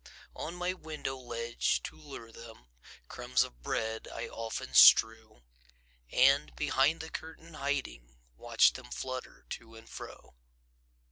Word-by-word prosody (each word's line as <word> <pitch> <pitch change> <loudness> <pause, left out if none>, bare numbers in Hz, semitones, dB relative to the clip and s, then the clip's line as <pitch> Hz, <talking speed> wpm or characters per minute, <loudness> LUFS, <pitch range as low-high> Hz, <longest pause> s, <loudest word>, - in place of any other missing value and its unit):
On 170 - -5
my 180 +1 -1
window 155 -6 -5
ledge, 120 -2 -2
to 75 - -7
lure 115 +8 -11
them, 115 - -13 0.4
Crumbs - - +1
of - - -11
bread 110 - -3
I - - -5
often 115 0 -6
strew, 110 - +6 0.7
And, 135 +3 +4
behind 145 +1 +2
the 160 - -8
curtain 160 +1 -9
hiding, 65 - -4 0.2
Watch - - +3
them - - -10
flutter 130 - -6
to 115 0 -8
and 115 0 -14
fro. - - -10
120 Hz, 130 wpm, -31 LUFS, 110-145 Hz, 0.7 s, strew